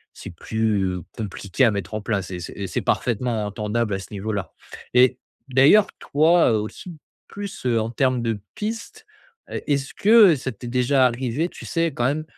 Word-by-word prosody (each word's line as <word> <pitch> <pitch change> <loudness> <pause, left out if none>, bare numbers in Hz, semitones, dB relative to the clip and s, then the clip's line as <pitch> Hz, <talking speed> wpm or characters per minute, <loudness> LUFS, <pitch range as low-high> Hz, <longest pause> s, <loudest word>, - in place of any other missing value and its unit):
c'est - - -9
plus, 110 0 0
heu, 90 -2 -3
compliqué 105 +3 -1
à 115 - +4
mettre 100 0 -4
en 110 - -3
place 100 -4 -2
et 90 - -5
c'est 90 - -7
et 100 -1 -4
c'est 80 - -2
parfaitement 115 -2 -1
entendable 105 +1 -2
à 95 - -4
ce 95 - -9
niveau-là 100 -4 -4 0.4
et 125 0 +5 0.3
d'ailleurs, 140 +11 +6
toi, 160 0 +3
heu, 110 - +2
aussi 170 - -8 0.3
plus, 200 -5 -8
heu, 115 -2 +2
en 110 - -3
termes 130 +1 +1
de 115 -2 -2 0.2
piste, 225 - -5 0.5
heu, - - -4
est-ce 140 -2 -1
que 210 -5 +6
ça 130 0 -4
t'es 120 +3 -9
déjà 125 +2 +3
arrivé, 125 +7 -2
tu - - -11
sais, 165 0 0
quand 120 - -1
même 150 +4 0
120 Hz, 190 wpm, -23 LUFS, 105-145 Hz, 0.5 s, d'ailleurs